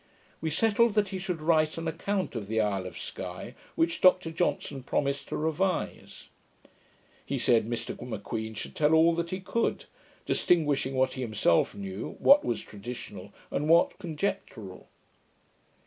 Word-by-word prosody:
We 160 - -1
settled, 220 +6 +3
that 205 -2 +2
he 190 -1 -4
should 180 -4 -4
write 155 -1 +3
an 165 0 -3
account 185 +4 -2
of 110 -5 -5
the 110 +1 0
Isle 100 -3 0
of - - -9
Sky, - - -7 0.2
which 165 +1 +1
Dr 185 -2 +5
Johnson 160 -4 -1
promised 140 +2 -1
to - - -3
revise. 165 +4 -2 0.9
He - - -3
said, 115 -2 +3
Mr 120 -1 -3
M'Queen 110 -1 -5
should - - -6
tell 155 +1 +4
all 165 +1 +5
that 170 0 -2
he 185 - -3
could; 230 +5 -1 0.4
distinguishing 145 -6 +2
what 130 0 +2
he 130 - -5
himself 105 -8 +2
knew, 95 0 -6
what 285 +1 +6
was 120 - -1
traditional, 110 +4 -8 0.2
and 150 +2 -1
what 170 +1 +4
conjectural. 150 - -4
155 Hz, 150 wpm, -28 LUFS, 115-175 Hz, 0.9 s, what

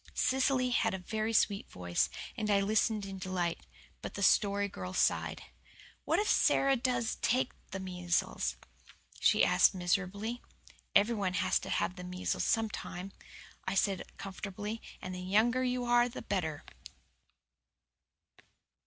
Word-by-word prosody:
Cecily 260 -1 +2
had 225 -4 +2
a 180 -1 -9
very 220 +2 -1
sweet 210 -2 +2
voice, 90 -1 0 0.3
and 215 -1 -2
I 200 -1 +4
listened 215 +1 +1
in 195 -1 -7
delight. 180 -2 -2 0.3
But - - -7
the 200 - -2
Story 200 +1 +3
Girl 185 -1 -7
sighed. - - +1 0.6
"What - - +2
if 420 - +1
Sara 275 0 +4
does 240 -2 -1
take 255 +2 +1 0.2
the 190 - -5
measles?" 180 -2 -1 0.6
she - - +5
asked - - +5
miserably. 200 +6 -1 0.5
"Everyone 200 -3 +3
has - - +2
to - - -8
have 185 - -1
the 180 - -7
measles 180 +1 -2
sometime," 205 -4 -2 0.6
I 190 - -1
said 195 -1 -1
comfortingly, 205 +3 -6 0.2
"and 185 - -5
the 180 - -5
younger 220 +7 +2
you 250 0 0
are 240 0 +4
the 240 - -8
better." 160 -6 -2
200 Hz, 135 wpm, -32 LUFS, 185-230 Hz, 0.6 s, she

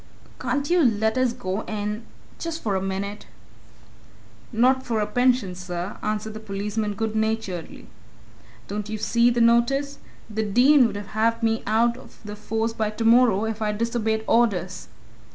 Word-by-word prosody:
can't 260 +3 -1
you 355 -1 +4
let 220 -2 +2
us 255 -1 +2
go 220 -5 -3
in 210 +1 -3 0.4
just 330 -1 -5
for 205 -3 0
a 190 - 0
minute?" 195 +2 -4 1.2
"Not 255 +3 +3
for 230 -3 -1
a 210 - +1
pension, 245 -2 +1
sir!" 180 +1 -5
answered 215 0 -3
the 215 - -7
policeman 210 0 -3
good 220 +1 -2
naturedly. 220 -6 -3 0.8
"Don't 210 +1 -4
you 215 - -3
see 235 +3 +3
the 240 0 +1
notice? 240 +5 +2 0.3
The 220 0 -3
Dean 245 +6 +5
'ud - - -6
have 225 +3 -1
me 225 0 +1
out 235 +3 +2
of 255 - -15
the 210 0 -6
force 225 +2 -2
by 220 -2 -1
tomorrow 225 -1 +3
if 225 0 -4
I 210 -1 0
disobeyed 220 0 -1
orders. 190 -6 +1
220 Hz, 155 wpm, -24 LUFS, 210-235 Hz, 1.2 s, Dean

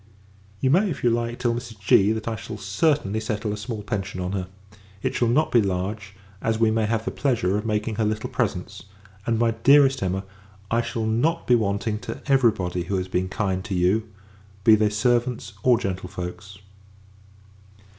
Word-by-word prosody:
You 130 - +3
may, 190 +6 +4
if 160 - -5
you 120 - +4
like, 120 0 -1
tell 120 -1 0
Mrs. 115 -3 -7
G. 100 +1 +4
that 110 0 -3
I 115 - -1
shall 110 0 -7
certainly 105 +2 0
settle 110 -1 -2
a - - -2
small 105 0 -5
pension 95 -2 -4
on 90 0 -2
her. 95 -2 -3 0.6
It - - 0
shall 120 - +1
not 145 +7 +2
be 120 - +5
large, 100 +2 -3 0.3
as 110 0 0
we 115 -1 +4
may 110 -1 +1
have 115 0 -1
the - - -2
pleasure 115 -9 0
of 105 +2 -2
making 105 0 -1
her 110 - +1
little 105 0 -2
presents; 95 -4 -3 0.4
and, 115 -1 +2
my 115 0 +2
dearest 135 +4 +5
Emma, 95 0 -1 0.5
I 115 +1 +3
shall 115 -1 -3
not 125 +10 +1
be 125 - +3
wanting 105 -1 0
to - - -6
every 135 -4 +5
body 90 -4 -3
who 100 - -2
has 95 0 -1
been 95 0 -1
kind 95 -2 -1
to 100 -2 -4
you, 100 +5 +1 0.5
be 110 - +7
they 110 0 +4
servants 120 0 0
or 125 -2 +4
gentlefolks. 95 -1 -5
110 Hz, 190 wpm, -24 LUFS, 100-115 Hz, 0.6 s, be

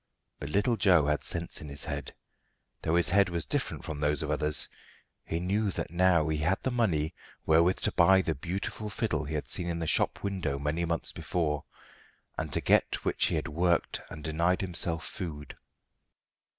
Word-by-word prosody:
But 70 - -5
little 105 +7 +2
Joe 90 -7 +5
had 75 0 0
sense 85 0 -2
in 75 - -8
his 70 +1 +1
head, 70 -3 -5 0.7
though 80 - 0
his 85 -1 +3
head 100 +1 +4
was 85 -2 -1
different - - -2
from 75 -2 -5
those 75 +1 +1
of 75 - -2
others; 75 0 +2 0.6
he 80 - -3
knew 100 +4 0
that - - -4
now 90 -3 +3
he 75 -1 0
had 85 +5 +2
the 130 - 0
money 90 -11 +1 0.3
wherewith 85 +3 +4
to - - +2
buy 95 +2 +5
the 80 - 0
beautiful 95 +7 -4
fiddle 95 -5 -1
he 75 +2 -4
had 75 - -3
seen 90 - -1
in 85 - -2
the 85 - -2
shop - - +1
window 95 -8 -2
many 75 +4 -1
months 85 -1 -2
before, 75 -4 -2 0.7
and - - -4
to - - 0
get - - +2
which - - +2
he - - 0
had 75 - -2
worked 85 +2 +1
and 75 - -9
denied 85 +4 +1
himself 85 -4 0
food. 75 -2 -6
85 Hz, 190 wpm, -29 LUFS, 75-90 Hz, 0.7 s, Joe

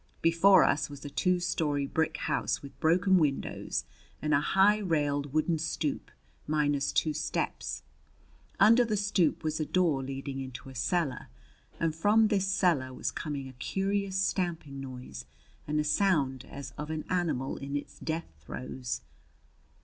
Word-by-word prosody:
Before 170 +4 +6
us 145 - +1
was 145 0 -10
a 145 - -6
two 180 +3 +2
story 150 -5 0
brick 160 +3 0
house - - -1
with 140 - -11
broken 180 +4 +4
windows 145 -4 -1 0.3
and 150 0 0
a 140 - +5
high, 195 +6 +4
railed 145 -6 0
wooden 155 +2 +1
stoop, 155 -2 -2 0.4
minus 145 -2 +1
two 155 - +1
steps. 155 - -3 0.8
Under 230 +5 +7
the 215 -3 0
stoop 195 -5 +1
was 155 0 -1
a - - +1
door 170 -7 +2
leading 135 +1 -5
into 130 0 -7
a - - -10
cellar, 140 +2 -1 0.5
and 165 -2 +1
from 210 +6 +4
this 195 -3 +1
cellar 175 -9 +2
was 130 - -3
coming 145 -3 -4
a 130 - -10
curious 195 +8 -1
stamping 170 -7 -1
noise 125 - -8 0.4
and 150 +1 0
a - - +2
sound 150 -5 +1
as 140 -1 -7
of 150 +1 -4
an 155 -1 -3
animal 165 -8 -1
in 140 +1 -5
its 145 - -5
death 160 - -4
throes. 125 - -5
155 Hz, 155 wpm, -30 LUFS, 140-180 Hz, 0.8 s, Under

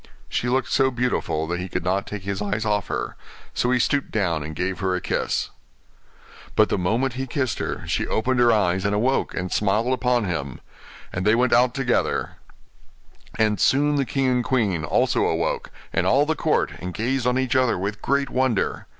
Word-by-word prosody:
She 125 - -1
looked 130 +1 0
so 135 -1 +3
beautiful 120 -11 -1
that 85 +2 -3
he 90 +1 -5
could - - -3
not 95 +2 0
take 105 -2 -6
his 100 0 -3
eyes 105 +2 -2
off 105 -2 0
her, - - -3 0.4
so 125 - 0
he 125 - +3
stooped 140 +3 +1
down 85 -7 0
and 80 +1 -6
gave 90 +3 -2
her 95 -2 0
a - - -1
kiss. - - -1 1.0
But - - +4
the - - 0
moment 115 +8 0
he 130 +2 -4
kissed 130 -1 -1
her - - -4
she - - -1
opened 125 +3 0
her 120 -1 +5
eyes 95 -3 +2
and 100 +1 +1
awoke, 125 +6 0
and 90 0 -3
smiled 105 +5 +1
upon 125 -2 +1
him; 75 -9 -3 0.5
and 90 - -2
they 105 +3 +4
went 125 +1 +2
out 125 +1 +4
together; 135 -3 0 1.0
and 110 -2 +2
soon 145 +2 +3
the 140 - +2
king 135 +1 -1
and 125 -1 +2
queen 105 -11 0
also 75 - +2
awoke, - - -1 0.2
and - - +1
all 140 +3 +4
the 160 - +1
court, 155 - +1
and 90 -1 -6
gazed 125 +2 0
on 125 +1 +2
each 130 0 0
other 130 -5 +3
with 100 +3 -4
great 140 0 0
wonder. 130 -5 0
115 Hz, 200 wpm, -23 LUFS, 95-130 Hz, 1.0 s, her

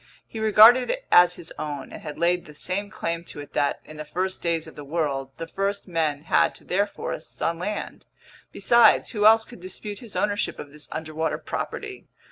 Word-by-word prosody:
He 225 - -8
regarded 220 +4 +7
it - - -2
as 175 0 +7
his 160 - -9
own 145 -2 -5
and - - -8
had 150 -2 -7
laid 175 +1 +1
the 150 - -13
same 200 +6 -2
claim 170 -4 -3
to - - -8
it 145 0 -10
that, 145 - 0
in 155 - -11
the 155 - -5
first 185 +4 -3
days 165 -2 0
of 160 - -12
the 150 - -8
world, 140 -3 -2
the 165 - -5
first 200 +4 -2
men 155 -4 -1
had 160 - +2
to - - -12
their 200 +3 +1
forests 165 -5 -7
on 165 0 -1
land. 205 +4 -5 0.4
Besides, 235 +4 +4
who 210 -2 +4
else 225 0 +6
could 240 - -13
dispute 200 +2 -7
his 230 -4 -11
ownership 205 0 0
of 145 - -9
this 150 0 -8
underwater 155 0 -2
property? 410 -2 -6
175 Hz, 205 wpm, -25 LUFS, 155-205 Hz, 0.4 s, regarded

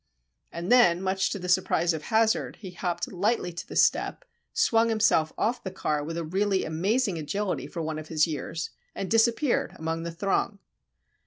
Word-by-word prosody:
And 170 +4 -4
then, 210 -9 +6
much 190 0 0
to - - -3
the 180 -1 -6
surprise 180 -2 +2
of 160 - -4
Hazard, 225 0 +1
he 190 -4 -9
hopped 175 -1 -3
lightly 195 -1 0
to 170 - -7
the - - -8
step, - - +2 0.3
swung 230 0 +3
himself 215 -8 +3
off 240 +3 0
the 190 - -3
car 150 -5 -2
with 165 +3 -5
a 170 - -2
really 195 +3 0
amazing 190 +4 0
agility 195 +6 -2
for 170 - -5
one 155 0 -3
of 155 - -9
his 155 -1 +2
years, 160 +1 -4 0.2
and 190 - -4
disappeared 235 +4 +2
among 160 +1 -3
the 170 - -4
throng. 195 +3 -1
185 Hz, 180 wpm, -27 LUFS, 165-215 Hz, 0.3 s, then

